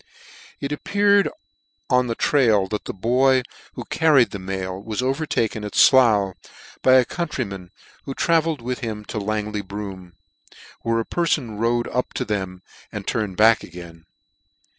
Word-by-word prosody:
It 140 - -4
appeared 200 +6 +2 0.6
on 125 -1 +2
the 115 - -2
trial 115 -10 +3
that 105 - -4
the - - -3
boy 125 +5 +2 0.3
who - - -6
car 160 -2 +2
ried 125 -3 +5
the 100 - -5
mail 95 0 -4
was 110 +3 -3
overtaken 130 -5 -1
at 105 - -6
Slough, 110 -7 +5 0.5
by 130 - +5
a 130 -1 +6
countryman, 115 - -4 0.4
who 135 - -5
travelled 165 -5 +1
with 125 +1 -3
him 110 -2 -5
to 110 - -4
Langley 105 0 -2
Broom, 95 -3 -8 0.7
where 115 0 0
a 115 - -2
perfon 140 -11 -1
rode 120 +1 +1
up 125 - -2
to - - -2
them 95 -3 -4 0.3
and - - -6
turned 105 -5 -2
back 110 0 +5
again. 85 -1 -11
115 Hz, 155 wpm, -22 LUFS, 100-130 Hz, 0.7 s, a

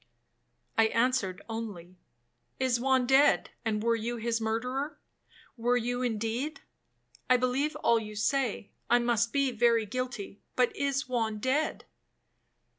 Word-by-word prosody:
'—I 225 - +6
answered 230 -6 0
only, 205 -6 -6 0.6
'Is 255 -2 +2
Juan 260 0 +2
dead, 270 +3 +4
and 215 -2 -1
were 230 0 +3
you 235 +2 -3
his 230 0 -1
murderer,—were 245 0 -3
you 245 +1 -1
indeed? 235 +5 -2 0.7
I 255 - +6
believe 255 +5 0
all 230 -1 +4
you 215 -1 -8
say, 225 -1 0 0.2
I 240 - +6
must 235 -1 +1
be 275 -1 +1
very 235 -1 +3
guilty, 220 -3 -5
but 250 -1 +2
is 280 +1 -1
Juan 225 -4 -1
dead?' 265 +8 -1
240 Hz, 125 wpm, -29 LUFS, 225-255 Hz, 0.7 s, I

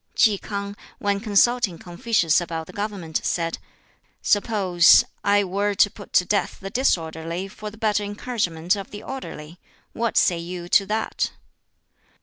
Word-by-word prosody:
Ki 210 -4 +4
K'ang, 200 -1 -5 0.2
when 200 -1 0
consulting 215 -2 +2
Confucius 175 -2 +1
about 165 -1 -4
the - - -13
government, 200 -6 -3
said, 165 -1 -1 0.6
"Suppose 195 -5 +5 0.2
I 205 0 +3
were 200 +2 -1
to 205 0 +4
put 205 -3 -12
to 180 - +4
death 205 +2 0
the 195 0 -7
disorderly 165 -6 -1
for 210 +2 -8
the 215 - -14
better 210 -1 +1
encouragement 205 -5 -1
of 200 -1 -7
the 205 - -9
orderly 175 - -8 0.3
what 235 -1 -1
say 175 -2 +3
you 175 +1 -6
to 195 +1 +4
that?" 220 +2 -1
200 Hz, 145 wpm, -23 LUFS, 175-210 Hz, 0.6 s, Suppose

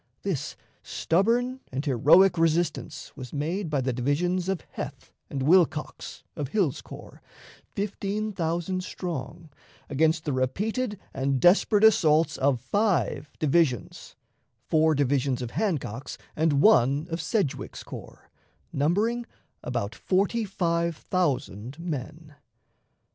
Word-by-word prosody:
This - - -3 0.3
stubborn 235 +9 +1
and 135 +4 -3
heroic 160 +8 +5
resistance 165 0 0
was 130 -4 -8
made 165 +5 -2
by 145 -3 0
the 130 0 -1
divisions 170 +9 0
of 190 -4 -1
Heth - - -7 0.2
and 135 -2 -3
Wilcox, 160 -1 +1
of 150 -4 -3
Hill's 165 -3 0
corps, - - -12 0.5
fifteen 205 +1 -2
thousand 175 +1 -2
strong, 165 -3 -6 0.4
against 160 +3 +2
the 145 - -1
repeated 205 - -1
and 135 0 0
desperate 200 - +4
assaults 160 -7 +5
of 135 -2 +2
five 195 - 0
divisions 150 - 0 0.5
four 160 0 +3
divisions 135 -2 +1
of 120 -2 -5
Hancock's 145 - -2 0.2
and 150 -3 +2
one 145 - +5
of 165 0 -2
Sedgwick's 160 - -2
corps, - - -11 0.4
numbering 210 +12 +1 0.3
about 115 -4 -3
forty 200 - 0
five 170 -4 0
thousand 135 - -2
men. 160 -1 -6
160 Hz, 115 wpm, -26 LUFS, 140-190 Hz, 0.5 s, heroic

